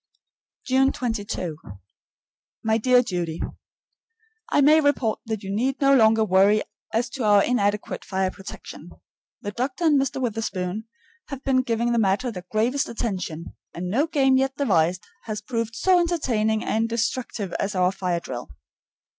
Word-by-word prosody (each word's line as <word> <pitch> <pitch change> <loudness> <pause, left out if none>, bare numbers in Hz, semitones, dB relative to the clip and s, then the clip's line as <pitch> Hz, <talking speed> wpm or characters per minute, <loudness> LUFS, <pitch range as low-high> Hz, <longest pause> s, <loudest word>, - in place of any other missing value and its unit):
June 265 +1 +3
22. 205 -9 -3 1.1
My 220 0 +2
dear 250 +2 +4
Judy: 175 -6 -3 1.1
I - - +3
may 305 +3 +6
report 270 -7 +1
that 220 -2 -3
you 195 +1 -3
need 260 +5 0
no 275 -1 +4
longer 220 -2 +5
worry 200 +2 +4 0.3
as 235 +2 0
to 260 - -4
our 205 -2 +5
inadequate 210 -4 0
fire 190 -1 -1
protection. 195 0 -10 0.5
The 205 - -3
doctor 255 - -3
and 295 -4 +4
Mr. 270 0 -2
Witherspoon 215 -4 -3 0.4
have 275 -2 -7
been 260 -1 +3
giving 235 -1 0
the 235 - +2
matter 210 +4 +1
their 180 -3 -9
gravest 245 +7 +1
attention, 185 -8 -4 0.2
and 180 +1 -4
no 280 +9 +2
game 270 -4 +3
yet 270 0 0
devised 180 - +1 0.2
has 215 -1 -3
proved 230 0 -3
so 365 +8 +4
entertaining 235 -11 0
and 225 +1 0
destructive 230 -3 -2
as 200 +1 -2
our 180 0 +3
fire 180 -2 -2
drill. 125 -6 -7
225 Hz, 150 wpm, -24 LUFS, 195-260 Hz, 1.1 s, may